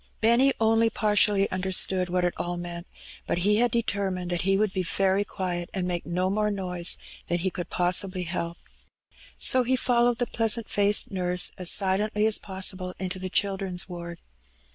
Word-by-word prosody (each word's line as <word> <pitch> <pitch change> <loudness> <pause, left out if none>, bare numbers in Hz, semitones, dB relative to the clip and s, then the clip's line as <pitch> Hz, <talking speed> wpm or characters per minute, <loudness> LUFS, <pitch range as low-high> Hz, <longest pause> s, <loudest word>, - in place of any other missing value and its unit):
Benny 235 +5 +4
only 225 0 +3
partly 210 -2 +2
understood 185 0 +1
what 180 0 +1
it 175 - 0
all 175 0 -3
meant^ 175 0 -6 0.4
but - - 0
he 210 +1 +4
had 240 +2 +3
determined 195 -6 -1
that 175 - 0
he 195 +1 +2
would 210 -1 0
be 190 - -1
very 190 +3 +1
quiet^ 180 -4 -4
and 185 -2 -1
make 175 -4 -3
no 180 +2 0
more 210 +1 +1
noise 180 -4 0 0.3
than 175 - 0
he 185 +2 -2
could 175 -1 -6
possibly 180 +1 0
help. 170 -1 -4 0.8
So 255 - +4
he 255 +1 +1
followed 245 -2 +2
the 245 - 0
pleasant 225 -1 0
faced 205 0 +2
nurse 180 -1 +1
as 180 -2 -1
silently 210 +2 +1
as 220 -1 +2
possible 190 -1 -3
into 185 0 -4
the 185 0 -4
Children's 190 -2 -1
Ward. 170 -2 -7
190 Hz, 175 wpm, -26 LUFS, 180-210 Hz, 0.8 s, Benny